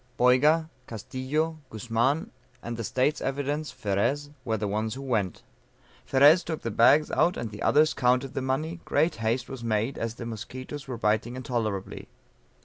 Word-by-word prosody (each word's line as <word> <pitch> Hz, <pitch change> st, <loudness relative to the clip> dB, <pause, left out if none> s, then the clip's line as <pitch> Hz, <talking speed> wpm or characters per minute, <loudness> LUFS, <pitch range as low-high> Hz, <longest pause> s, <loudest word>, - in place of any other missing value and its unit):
Boyga, 150 Hz, +6 st, +4 dB, 0.2 s
Castillo, 135 Hz, -, -3 dB
Guzman, 120 Hz, +7 st, 0 dB, 0.3 s
and 120 Hz, 0 st, -4 dB
the 115 Hz, -, -4 dB
"State's 130 Hz, +7 st, 0 dB
Evidence," 145 Hz, +3 st, -2 dB
Ferez, 120 Hz, +9 st, -1 dB
were 110 Hz, -4 st, -1 dB
the 105 Hz, 0 st, -2 dB
ones 110 Hz, +3 st, -2 dB
who 135 Hz, -, -7 dB
went. 110 Hz, -9 st, -1 dB, 0.6 s
Ferez 145 Hz, +6 st, +6 dB
took 160 Hz, -2 st, -5 dB
the 115 Hz, -, -2 dB
bags 140 Hz, +8 st, +5 dB
out, 175 Hz, -, +2 dB
and 115 Hz, -2 st, -4 dB
the 105 Hz, -, -9 dB
others 155 Hz, +2 st, +4 dB
counted 125 Hz, +2 st, +1 dB
the -, -, -2 dB
money; 155 Hz, +6 st, -2 dB
great 160 Hz, +4 st, +1 dB
haste 115 Hz, +3 st, -1 dB
was 130 Hz, -3 st, -8 dB
made 115 Hz, +3 st, -1 dB
as 115 Hz, 0 st, -3 dB
the 120 Hz, -, -7 dB
musquitoes 130 Hz, +5 st, -7 dB
were 125 Hz, -2 st, -4 dB
biting 110 Hz, +2 st, 0 dB
intolerably. 115 Hz, -7 st, -3 dB
130 Hz, 160 wpm, -27 LUFS, 115-145 Hz, 0.6 s, Ferez